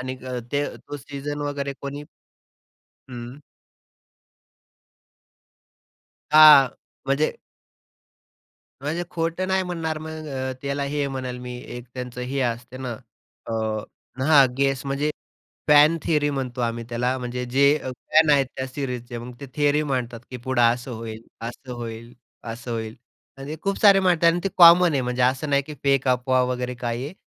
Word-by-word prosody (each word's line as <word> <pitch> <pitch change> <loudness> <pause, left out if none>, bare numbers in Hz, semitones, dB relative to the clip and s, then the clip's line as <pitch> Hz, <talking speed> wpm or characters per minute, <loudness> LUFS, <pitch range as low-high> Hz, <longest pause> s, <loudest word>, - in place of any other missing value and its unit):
आणि 130 0 -4 0.4
ते 145 0 +1
तो 145 - -9
सीझन 145 +1 -6
वगैरे 140 -1 -3
कोणी 140 +1 -6 1.1
हं. 120 +3 -8 2.9
हां, 150 -4 +9 0.4
म्हणजे 140 +3 +1 1.5
म्हणजे 155 +5 -2
खोटं 165 +2 -2
नाही 190 0 +2
म्हणणार 165 -3 -3
मग 155 0 -7
अ, 130 -1 -3
त्याला 140 0 -2
हे 140 0 -1
म्हणेल 130 -2 -5
मी 125 0 -7 0.2
एक 120 - -8
त्यांचं 125 -1 -6
हे 130 +2 -3
असते 120 0 -3
ना 130 -2 -4 0.5
अ, - - -4 0.7
...हां, 150 -2 +7
अ, - - -10
गेस 135 -1 +1
म्हणजे 140 +2 0 0.6
फॅन 150 +2 +7
थियरी 150 -2 +1
म्हणतो 130 -3 -4
आम्ही 115 -1 -2
त्याला. 125 +2 -1
म्हणजे 125 0 -4
जे 140 +3 +4 0.2
फॅन 155 +5 +2
आहेत 140 -2 +4
त्या 130 - -3
सीरीजचे, 125 -3 -5
मग 120 +1 -8
ते 140 - -7
थियरी 145 0 +2
मांडतात 125 -5 -3
की 125 - -5
पुढं 125 0 0
असं 120 +2 +2
होईल, 110 -1 -7 0.2
असं 125 +2 -8
होईल, 115 0 -7 0.4
असं 120 +1 -8
होईल 110 -1 -4 0.4
म्हणजे 140 +3 -6
खूप 195 0 -1
सारे 200 -2 +7
मांडतात 175 -3 +2
आणि 175 - -1
ते - - +2
कॉमन 175 0 +8
आहे. 140 - +1
म्हणजे 125 0 -1
असं 130 +4 +1
नाही 140 0 +3
की 150 - -7
फेक 135 -1 +2
अफवा 125 0 +2
वगैरे 125 0 -3
काही 120 0 -3
आहे. 150 +6 -7
135 Hz, 150 wpm, -24 LUFS, 125-150 Hz, 2.9 s, हां